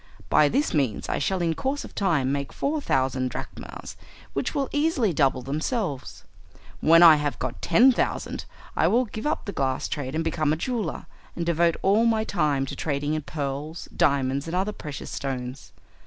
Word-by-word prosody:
By 150 - +5
this 285 - 0
means 135 -8 0
I - - 0
shall 180 +5 0
in 165 -1 +1
course 270 - -2
of - - -12
time 155 -10 +1
make 140 0 -2
four 295 +2 -1
thousand 130 - 0
drachmas, - - -8 0.4
which - - -2
will 275 -2 0
easily 290 - +1
double 135 -4 +2
themselves. 150 - -3 0.6
When 165 +2 +6
I 160 -3 +9
have 145 -3 -2
got 130 -1 -4
ten 240 +10 +6
thousand 245 - -2 0.3
I - - +3
will 250 +3 +3
give 220 +4 -5
up 305 - -1
the 200 - -3
glass 130 -6 -1
trade 140 -1 -4
and 165 - 0
become 155 -2 0
a - - +2
jeweller, 215 - -3 0.3
and 170 - -2
devote 170 0 +2
all 210 +4 +4
my 220 -1 +2
time 150 -9 0
to - - -6
trading 145 0 -1
in 155 - -1
pearls, 145 +2 -5
diamonds, 140 +1 +1
and 165 - -3
other 190 +3 0
precious 150 -7 -7
stones. 130 -1 -5
155 Hz, 185 wpm, -25 LUFS, 140-200 Hz, 0.6 s, I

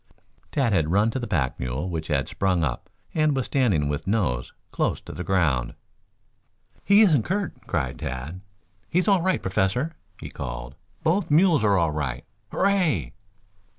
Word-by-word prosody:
Tad 130 -7 +1
had 80 -5 +2
run 105 +6 +3
to 130 - -3
the 120 - -4
pack 75 -11 -1
mule 65 +7 -3
which 80 -3 -4
had 70 -5 -2
got 95 -3 +2
up, 65 -6 -3 0.2
and 155 -2 +2
was 130 - 0
standing 105 - +1
with 75 +4 -3
nose 90 - 0 0.2
close - - 0
to - - -10
the 90 - -5
ground. 75 -11 +1 1.1
"He 200 +2 +6
isn't 155 - +4
hurt," 195 0 -1
cried 65 -7 -2
Tad. 70 +9 -5 0.5
"He - - -1
is 180 - +2
all 195 -4 +4
right, 185 +1 0
Professor," 95 - 0 0.3
he - - -8
called. - - -6 0.3
"Both 175 +4 +1
mules 160 - +4
are 100 -2 +4
all 85 -3 +2
right. 70 -5 -3 0.3
Hooray!" 175 - +1
95 Hz, 165 wpm, -25 LUFS, -, 1.1 s, He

